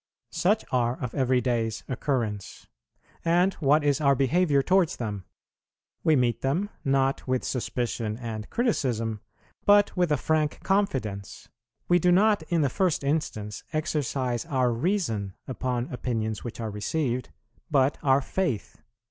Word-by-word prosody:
Such 210 +5 +1
are 120 -1 +1
of 125 -1 -4
every 130 -2 +2
day's 115 -2 -1
occurrence; 120 -7 -3 0.6
and 175 +3 +3
what 150 0 +3
is 145 0 +2
our 140 -1 +4
behaviour 140 +2 +2
towards 180 +1 +3
them? 105 -5 -5 0.8
We 160 - +4
meet 120 -4 +1
them, 175 +11 0
not 135 -1 +1
with 130 -1 0
suspicion 120 -3 -2
and 110 -3 -6
criticism, 115 - 0 0.4
but 205 0 +5
with 180 -3 +1
a 150 - +3
frank 155 +2 0
confidence. 130 - -1 0.4
We 175 0 +4
do 180 +1 +3
not 205 +1 +4
in 170 -2 +2
the 145 - +3
first 170 +3 0
instance 110 -8 -2
exercise 140 -6 -1
our 130 -3 +1
reason 115 - -1
upon 125 -1 -2
opinions 110 -4 -2
which 120 -1 -7
are 110 -2 -3
received, 125 +4 -2 0.4
but 140 -2 +2
our 135 0 +4
faith. 140 - -3
135 Hz, 140 wpm, -27 LUFS, 115-160 Hz, 0.8 s, but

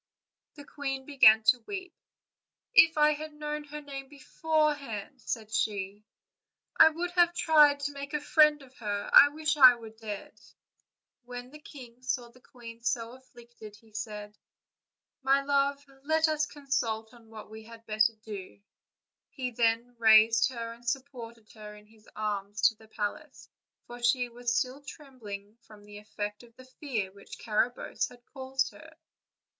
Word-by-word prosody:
The 290 -2 -12
queen 270 -2 -5
began 220 -6 +6
to 235 +3 +4
weep. 375 -3 -6 0.8
"If 325 -9 +6
I 300 0 +5
had 305 +1 -8
known 300 0 -5
her 300 +1 -8
name 275 -2 -9
beforehand," 290 -5 -2
said 220 -3 -5
she, 205 -1 -2 0.7
"I - - +8
would 345 +3 -4
have 345 -1 +3
tried 295 -4 +5
to 290 0 -2
make 280 +1 -7
a - - 0
friend 300 0 +4
of 260 -1 -19
her: 205 -3 -4
I 285 - +10
wish 305 +1 -2
I 255 -3 +9
were 225 -2 -11
dead." 220 -2 -9 0.8
When 245 +1 -9
the 300 - -12
king 250 -5 -13
saw 250 -1 -3
the 255 - -21
queen 235 -2 -13
so 230 -1 -2
afflicted, 240 -4 -14
he 220 0 -22
said: 210 -1 -7 0.8
"My 275 +1 +2
love, 280 0 0 0.2
let 315 +3 +2
us 310 -1 0
consult 230 -7 -3
on 230 -2 -18
what 215 -1 -11
we 220 0 -10
had 230 0 -14
better 215 +1 +2
do/' 200 -2 -9 0.7
He 255 -2 -5
then 235 +1 0
raised 220 +1 +6
her 230 -2 -6
and 235 +1 -18
supported 240 -4 -6
her 210 -1 -11
in 210 0 -16
his 215 0 -22
arms 205 -1 -4
to 225 - +5
the 220 +1 -19
palace, 220 +8 -6 0.4
for 240 0 -11
she 245 0 +1
still 255 +3 0
trembled 235 -8 -10
from 215 -3 -17
the 205 0 -11
effect 210 -1 -6
of 235 -1 -19
the 255 - -15
fear 255 - -4
which 200 +1 -13
Carabosse. 235 +3 -1
had 245 -1 -18
caused 265 -1 -3
her. 320 0 -15
245 Hz, 160 wpm, -29 LUFS, 220-285 Hz, 0.8 s, I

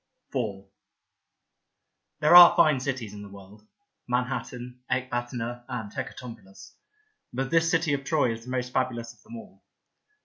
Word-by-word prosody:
Beauty 130 - 0 0.2
49 - - -20
IV - - -34 1.5
THERE 155 +3 +6
are 175 -1 +11
fine 150 -4 +4
cities 125 -6 -4
in 105 - -9
the 100 - -10
world 100 +2 -15 0.2
— - - -55
Manhattan, 125 0 -3
Ecbatana 120 -1 -3
and 110 -4 -5
Hecatompylus 115 -7 -9 0.3
— 430 0 -45
but 135 +1 -2
this 165 0 +3
city 165 -2 +1
of 140 -1 -2
Troy 140 -5 +1
is 115 0 -9
the - - -10
most 125 -1 -3
fabulous 120 -3 -2
of - - -27
them 225 +2 -12
all. 225 - -14
125 Hz, 165 wpm, -26 LUFS, 115-140 Hz, 1.5 s, are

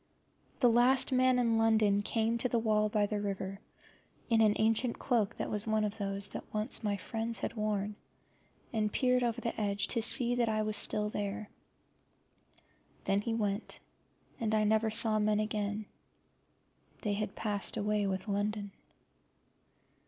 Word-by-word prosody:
The 245 - +6
last 250 +4 +4
man 255 0 +3
in 230 -2 +2
London 215 -2 +3
came 225 +2 0
to 250 - 0
the 235 - +1
wall 215 -2 +1
by 210 0 +1
the 205 0 -3
river, 195 -1 -4 0.7
in 225 -1 +4
an 210 -1 +4
ancient 225 +2 +1
cloak 220 -5 0
that - - -4
was 210 +1 -3
one 220 0 +1
of 210 +1 -3
those 195 0 -3
that - - -8
once 215 +1 -3
my 205 -1 0
friends 225 +2 -3
had - - -3
worn, 210 -2 -2 0.8
and 215 -2 0
peered 250 +1 +2
over 240 -1 -1
the 230 -2 -3
edge 205 0 0
to 230 - +2
see 240 +2 +5
that 240 -2 +1
I 215 0 0
still 210 0 0
was 210 - -4
there. 205 +1 -4 1.5
Then 195 +1 +1
he 225 +1 -2
went, 205 -1 -2 0.6
and 220 -1 0
I 215 - +2
never 220 +1 +2
saw 220 0 +4
men 210 0 +2
again: 210 0 -2 1.2
they 210 -3 0
had 205 -1 -3
passed 205 -3 -2
away 210 0 0
with 190 +1 -3
London. 205 0 -2
215 Hz, 160 wpm, -32 LUFS, 205-225 Hz, 1.5 s, The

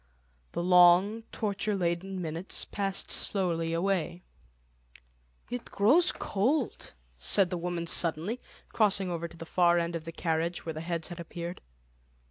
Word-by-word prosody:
The 170 - -2
long 180 +4 +6
torture 205 0 -1
laden 185 +1 -2
minutes 165 +3 -4
passed 195 -1 -2
slowly 170 -4 0
away. 175 0 -1 1.3
"It 245 -1 -4
grows 280 - +4
cold," 250 +7 -1 0.2
said 180 - +2
the 180 - -1
woman 175 -1 -3
suddenly, 170 +7 +2 0.3
crossing 195 -4 +2
over 170 0 -3
to 170 - -15
the 165 - -8
far 175 0 +3
end 170 0 -1
of 165 -1 -5
the 165 - -5
carriage, 165 +1 -2
where 160 - -3
the 155 - -6
heads 165 0 -2
had 175 -1 -8
appeared. 170 +1 -6
175 Hz, 140 wpm, -29 LUFS, 170-195 Hz, 1.3 s, long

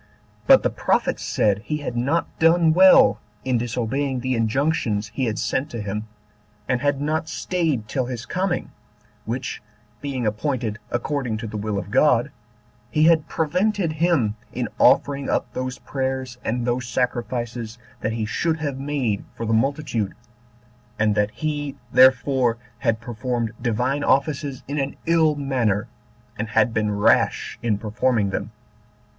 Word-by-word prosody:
But - - +7
the - - +1
prophet - - 0
said 105 -2 +1
he 150 +8 -3
had 145 -5 -5
not 140 +8 +1
done 165 0 +5
well 190 +2 +7 0.3
in 125 -2 +1
disobeying 125 +3 -1
the 130 +1 -1
injunctions 115 -2 0
he 130 - -1
had 110 -3 -2
sent 145 +4 -1
to 120 - -6
him, 105 +2 -4 0.6
and 125 -1 0
had 145 -1 +1
not 155 +2 -1
staid 160 -12 -1
till 130 +1 -1
his 125 -1 -5
coming, 185 -1 -2 0.5
which 125 +3 -4 0.4
being 135 -4 -3
appointed 110 0 -1
according 120 -2 -2
to 115 - -6
the 110 - -6
will 105 0 -2
of - - -5
God, - - +3 0.6
he 155 - +2
had 160 -1 +4
prevented 180 +3 0
him 155 -9 +1 0.2
in - - -3
offering 140 -1 +3
up - - -1
those 130 0 -3
prayers 130 -2 -3
and 120 +2 -1
those 125 0 -1
sacrifices 120 -2 -2 0.2
that 110 - -2
he 110 -1 -2
should 160 +9 0
have 145 -4 -3
made 135 -7 -1
for 115 - -4
the 115 - 0
multitude, 115 -4 0 0.8
and 105 -1 +2
that 105 0 +1
he 145 +1 -3 0.2
therefore 130 -1 +4 0.2
had 115 -1 +1
performed 120 0 -3
Divine 125 +5 0
offices 140 -1 0
in 145 +2 -2
an 135 0 -2
ill 160 -2 +3
manner, 125 -7 0 0.5
and 110 - -1
had 110 +1 +2
been 110 -1 +1
rash 100 - +2
in 110 -3 +1
performing 110 0 0
them. - - -3
125 Hz, 150 wpm, -23 LUFS, 115-145 Hz, 0.8 s, But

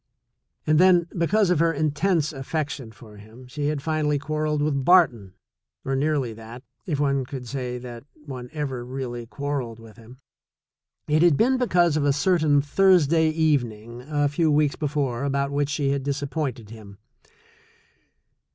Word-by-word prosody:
And 155 0 +3
then, 180 -2 +5
because 185 +3 +2
of 175 - +2
her 165 0 +3
intense 155 +1 0
affection 140 -3 -4
for 110 -3 -15
him, 110 +5 -14
she 145 +3 -4
had 150 -2 -2
finally 155 -2 0
quarreled 150 +1 -2
with 140 -3 0
Barton, 130 - +3 0.5
or 135 - -1
nearly 140 -4 0
that, 115 +3 -11 0.2
if 150 -5 -2
one 140 -2 +1
could 125 -1 -8
say 125 -1 -4
that 120 -1 -9 0.2
one 125 -3 -8
ever 140 -5 -4
really 120 -2 -6
quarreled 140 -4 -4
with 115 -1 -15
him. 115 +2 -15 0.9
It 155 +1 +2
had 170 -5 +5
been 255 +2 +2
because 175 -10 +2
of 150 - 0
a 140 - +3
certain 150 -2 +2
Thursday 165 -1 +3
even 155 -7 +1
ing 115 +3 -11
a 145 +2 0
few 155 +3 +1
weeks 150 -1 +2
before 140 -5 -2
about 140 0 -1
which 145 0 0
she 140 -1 0
had 140 -1 -2
disap 140 0 -3
pointed 125 -9 -4
him. 105 -3 -12
145 Hz, 160 wpm, -24 LUFS, 125-155 Hz, 0.9 s, then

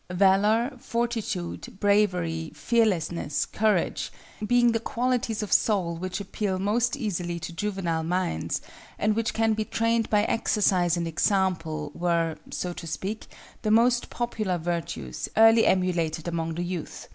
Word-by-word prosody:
Valor, 205 +7 +3
Fortitude, 230 -7 -3
Bravery, 180 -6 +1
Fearlessness, 170 -4 +1
Courage, 210 -5 0 0.4
being 245 0 +4
the 225 - 0
qualities 235 -1 -1
of 210 - -2
soul 185 -6 +2
which 185 +3 -4
appeal 200 -1 -2
most 225 +7 +1
easily 175 - -3
to 170 - -6
juvenile 175 -3 -2
minds, 165 - -1 0.3
and 210 0 +1
which 230 0 0
can 225 0 +2
be 215 0 -1
trained 230 +1 0
by 210 -1 +3
exercise 185 -6 +2
and 170 -1 -1
example, 165 -4 0
were, 170 -2 0
so 180 -1 -3
to 165 - -8
speak, 190 +8 -4 0.3
the 215 - -1
most 240 +3 +3
popular 215 -6 -2
virtues, 170 0 -4
early 225 0 +7
emulated 175 -4 +1
among 165 -1 -2
the 175 - -2
youth. 175 -2 -5
190 Hz, 135 wpm, -26 LUFS, 170-225 Hz, 0.4 s, early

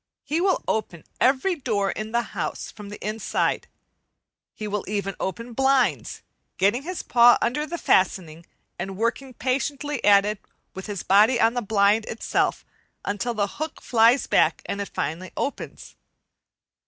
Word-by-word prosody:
He 305 +4 -1
will 380 0 +1
open 185 -7 -2 0.2
every 270 +9 +3
door 220 - -1
in 215 0 -5
the 235 +1 +1
house - - -4
from 210 -2 -11
the 205 - -8
inside; 215 +1 -1 0.9
he 215 - -5
will 210 -1 -2
even 200 -1 -2
open 230 +5 -4
blinds, 265 +1 +1 0.3
getting 205 +7 +2
his 360 +4 -5
paw 240 0 +6
under 295 +6 -1
the 345 - -4
fastening 170 - +1 0.3
and 190 +1 -5
working 240 +4 -2
patiently 280 +2 -2
at 200 -1 +6
it, 210 -1 -2 0.3
with 190 +2 -8
his 205 -4 -5
body 215 +5 +4
on 225 0 +4
the 245 - -1
blind 210 0 +2
itself, 225 - -1 0.4
until 220 +4 -2
the 205 -2 +1 0.2
hook 315 - -4
flies 235 +2 +3
back - - +2
and 200 - -3
it 200 - -5
finally 175 +4 -4
opens. 280 - -5
225 Hz, 155 wpm, -24 LUFS, 200-260 Hz, 0.9 s, paw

